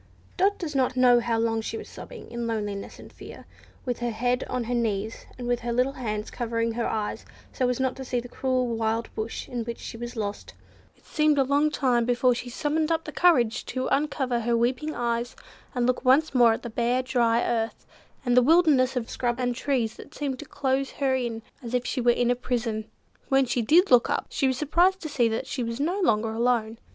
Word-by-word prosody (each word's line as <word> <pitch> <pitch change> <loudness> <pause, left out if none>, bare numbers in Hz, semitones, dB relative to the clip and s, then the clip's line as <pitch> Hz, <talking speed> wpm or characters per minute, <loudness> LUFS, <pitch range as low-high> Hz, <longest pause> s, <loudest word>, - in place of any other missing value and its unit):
Dot 395 +2 +2
does 325 -4 -5
not 260 -2 +1
know 250 -1 +6
how 230 -1 0
long 225 0 +1
she 225 - -4
was - - -8
sobbing - - -11
in 235 0 -3
loneliness 205 -3 -4
and - - -13
fear, - - -11 0.4
with 245 -2 -2
her 240 0 -1
head 245 +3 0
on 250 -1 -2
her 240 +2 -3
knees, 220 -2 -2
and 245 -1 -5
with 245 -1 +1
her 240 0 -3
little 250 +3 +2
hands 215 -5 -4
covering 230 -1 -1
her 235 +1 -2
eyes 210 -1 -3 0.3
so 255 -1 +1
as 250 - -1
not 260 -1 0
to 265 - -6
see 250 -1 -1
the 245 - -7
cruel 255 0 0
wild 225 -1 -1
bush 220 +1 -4
in 240 -2 -3
which 235 0 -5
she - - -8
was 240 +1 -6
lost. 205 -2 -5 0.4
It - - -29
seemed 305 -1 +2
a 275 - +5
long 285 +3 +2
time 250 -5 +1
before 245 +1 +3
she 245 +1 -5
summoned 305 +5 -1
up 325 0 -1
courage 255 -11 +3
to 255 0 -2
uncover 275 -4 0
her 235 0 +1
weeping 255 +6 0
eyes, 235 0 -2 0.4
and 245 -1 +1
look 255 +1 0
once 275 +4 +4
more 240 -3 +6
at - - -5
the 235 - -6
bare, 240 +3 +1
dry 235 -2 +2
earth, 230 -1 -2 0.4
and 245 -1 +2
the 250 - +7
wilderness 280 -3 +4
of 240 -2 -2
scrub 240 -1 -2
and 245 -1 0
trees 245 -5 -1
that - - -12
seemed 275 -3 -3
to 300 - -7
close 270 -1 -1
her 270 -2 0
in 235 -3 -2 0.2
as 245 -1 -4
if 250 0 0
she 255 - -1
were 240 - +3
in 240 0 +3
a - - +2
prison. 230 -3 -3 0.4
When 270 -1 +4
she 245 0 0
did 335 - +4
look 245 -2 +6
up, - - 0
she 270 - 0
was 260 -1 0
surprised 350 +6 +3
to 310 - -5
see 245 -5 +2
that 225 0 -2
she 260 - -4
was 230 +1 -4
no 345 +7 0
longer 225 - +2
alone. 230 -1 0
245 Hz, 225 wpm, -26 LUFS, 230-265 Hz, 0.4 s, the